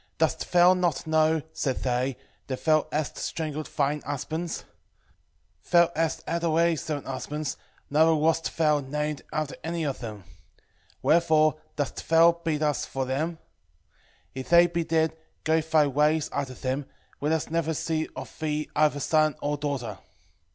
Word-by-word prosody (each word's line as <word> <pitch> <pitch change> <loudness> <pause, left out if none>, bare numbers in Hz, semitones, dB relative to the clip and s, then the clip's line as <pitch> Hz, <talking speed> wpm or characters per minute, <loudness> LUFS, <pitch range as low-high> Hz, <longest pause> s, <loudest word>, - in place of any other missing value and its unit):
Dost - - 0
thou 180 +1 +7
not 180 -3 0
know, 160 -1 +2
said 130 -3 -2
they, 125 +1 0 0.3
that 130 -2 -5
thou 155 -1 +4
hast 150 -3 -2
strangled 155 -1 -3
thine 145 +1 0
husbands? 160 +4 -4 1.0
thou 170 -1 +5
hast 160 0 -1
had 170 0 -1
already 165 0 +3
seven 150 0 -4
husbands, 140 +2 -4 0.4
neither 160 +2 +5
wast 160 +1 +1
thou 150 -2 +3
named 150 +2 -3
after 155 -2 -2
any 165 +1 -2
of 140 -3 -2
them. 110 -5 -7
3:9 - - -28 0.8
Wherefore 160 -2 +4 0.2
dost 145 -3 -4
thou 165 +1 +7
beat 165 -3 -2
us 150 -3 +1
for 135 -1 -3
them? 155 +6 -2 1.0
if 130 0 -7
they 170 +1 +7
be 170 0 -1
dead, 160 -1 +1 0.3
go 160 +1 +3
thy 155 -1 +3
ways 150 +2 +1
after 130 -2 -3
them, 130 +3 -3 0.3
let 150 +2 0
us 160 -1 -1
never 165 -1 0
see 160 +1 -1
of - - -8
thee 150 -1 -2
either 150 -1 +3
son 155 +1 +2
or 145 0 -1
daughter. 135 -8 -3
155 Hz, 155 wpm, -27 LUFS, 145-160 Hz, 1.0 s, thou